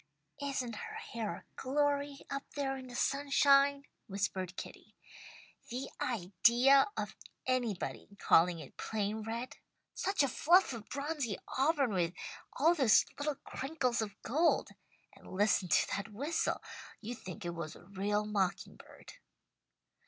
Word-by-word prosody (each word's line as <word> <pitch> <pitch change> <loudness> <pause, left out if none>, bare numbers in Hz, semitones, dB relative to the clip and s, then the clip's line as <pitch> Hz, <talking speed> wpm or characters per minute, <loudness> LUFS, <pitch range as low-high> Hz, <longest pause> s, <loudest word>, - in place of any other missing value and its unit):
"Isn't 260 -5 -2
her - - -6
hair 225 -3 -4
a - - -12
glory, 285 +1 0
up 275 0 -2
there 275 -2 -1
in 260 -1 -8
the 245 - -9
sunshine?" 280 +1 +4 0.2
whispered 190 -2 -2
Kitty. - - -9 0.7
"The 255 +3 -4
idea 240 +6 +4
of - - -3 0.3
anybody 245 -7 -1
calling 175 -1 +4
it 155 -5 -11
plain 215 0 -2
red 230 +3 -5 0.4
such 390 -6 +1
a - - +3
fluff 345 +3 +4
of 225 -2 -8
bronzy 280 -6 -2 0.2
auburn 275 -4 +2
with 175 -1 0 0.4
all 320 +6 +4
those 265 -10 +5
little 290 0 -1
crinkles 265 -5 -1
of 205 -2 -5
gold! 315 +8 +2 0.4
And - - -14
listen 200 -1 +2
to 160 - +3
that 200 +2 -5
whistle! 285 +10 -1 0.4
You'd 235 +2 -6
think 190 +1 -8
it 170 - -1
was 165 -2 -5
a - - -14
real 200 +2 -1
mocking 200 -3 -1
bird." - - -14
245 Hz, 140 wpm, -33 LUFS, 205-280 Hz, 0.7 s, those